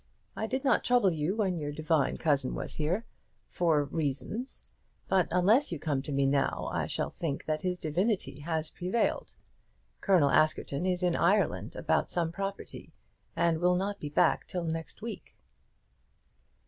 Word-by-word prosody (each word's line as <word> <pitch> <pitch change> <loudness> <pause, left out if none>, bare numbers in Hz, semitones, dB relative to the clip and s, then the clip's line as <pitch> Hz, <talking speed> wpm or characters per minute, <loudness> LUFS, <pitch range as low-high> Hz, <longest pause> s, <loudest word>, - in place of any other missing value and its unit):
I 220 - -2
did 260 +4 -2
not 275 - +3
trouble 245 -6 +4
you 160 +4 -1
when 190 -6 0
your 145 -1 -3
divine 155 -1 +1
cousin 140 -5 +1
was - - -3
here, 170 +9 -1 0.5
for 160 -4 +2
reasons; 160 - -3 0.4
but 185 -3 +3
unless 200 - +3
you 170 - -2
come 145 -2 -1
to 140 - -6
me 140 0 +2
now 135 0 0
I - - -1
shall - - -2
think 150 -5 -4
that 155 0 -1
his 180 -1 -1
divinity 180 +1 -1
has 160 0 -2
prevailed. 185 +6 -1 0.7
Colonel 175 -8 +4
Askerton 155 +1 +1
is 180 0 0
in 175 -2 +2
Ireland, 200 +4 +1
about - - 0
some 170 -2 0
property, 195 +2 -6 0.4
and 165 -1 +2
will 180 +1 +3
not 200 +2 -2
be 150 - -5
back 145 - +2
till 180 -2 -3
next 165 +4 -5
week." 230 -2 -7
170 Hz, 160 wpm, -30 LUFS, 155-195 Hz, 0.7 s, trouble